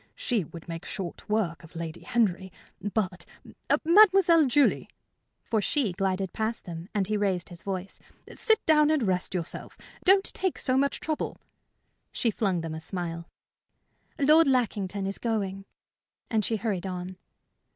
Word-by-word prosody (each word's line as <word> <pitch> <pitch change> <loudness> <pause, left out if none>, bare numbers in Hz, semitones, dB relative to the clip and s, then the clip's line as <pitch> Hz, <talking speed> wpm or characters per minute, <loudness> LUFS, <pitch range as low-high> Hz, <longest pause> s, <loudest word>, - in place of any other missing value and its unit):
She 225 -8 -1
would 165 +2 -11
make 165 +1 -6
short 185 -1 -6
work 205 -7 -1
of 165 +1 -15
Lady 165 0 -5
Henry. 190 -5 0 0.3
But, 195 -3 -2 0.6
Mademoiselle 355 -4 +6
Julie" 280 +2 +2 0.5
for 220 -2 0
she 250 -1 +1
glided 190 0 -1
past 220 0 -2
them, 170 +1 -7
and 205 -3 0
he 210 +2 -1
raised 190 -4 -1
his 175 -1 -10
voice 195 -1 -5 0.4
"sit 445 -1 +3
down 300 -1 +5
and 310 -5 +2
rest 185 -2 -1
yourself. 170 -3 -5 0.3
Don't 385 +1 +6
take 375 -2 0
so 255 - 0
much 280 +1 +1
trouble." 310 -1 -3 0.7
She 230 - 0
flung 195 -5 0
them 165 -1 -5
a 160 - -5
smile. 170 -1 -4 0.9
"Lord 305 +3 +5
Lackington 205 -7 0
is 195 0 -3
going," 195 -4 -2 0.7
and 220 -2 +2
she 225 - 0
hurried 205 -4 -2
on. 180 0 -6
200 Hz, 150 wpm, -27 LUFS, 180-255 Hz, 0.9 s, Mademoiselle